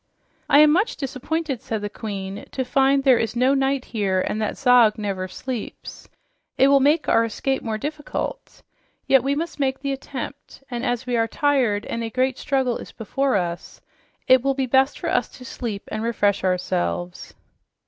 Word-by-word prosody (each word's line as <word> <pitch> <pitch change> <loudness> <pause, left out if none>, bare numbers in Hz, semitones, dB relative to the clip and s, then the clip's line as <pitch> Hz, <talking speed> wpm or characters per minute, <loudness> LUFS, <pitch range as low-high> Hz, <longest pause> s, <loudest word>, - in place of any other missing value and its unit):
"I 290 - +7
am 305 0 +7
much 375 +8 +1
disappointed," 275 0 -3
said 220 -5 -4
the - - -1
Queen, 200 -2 -6
"to 260 - -1
find 270 +2 +3
there 260 -3 +5
is 225 +1 -2
no 255 +3 +3
night 270 -1 0
here 195 -4 0
and 210 +3 -2
that 215 - -2
Zog 245 -5 +5
never 195 -3 -3
sleeps. 245 +4 -7 0.5
It 270 - +5
will 280 0 +6
make 295 +4 +2
our 230 - +4
escape 265 +4 -2
more 220 -2 -3
difficult. 305 - -5 0.4
Yet 270 -2 +5
we 275 +1 0
must 325 +1 -4
make 270 -1 0
the 275 -1 -1
attempt, 270 +1 -8
and 240 0 -3
as 245 -1 -1
we 245 -1 0
are 225 0 +2
tired 245 -6 +1
and 230 - -3
a 225 - -3
great 255 +2 0
struggle 265 -4 0
is - - -10
before 265 +4 -1
us, 175 -2 -3 0.5
it 255 -1 +6
will 275 +1 0
be 265 -1 0
best 265 +2 +2
for - - -5
us - - +1
to 250 - -12
sleep 225 -6 -5
and 215 - -3
refresh 205 -4 +1
ourselves." 90 - -2
255 Hz, 185 wpm, -23 LUFS, 215-275 Hz, 0.5 s, I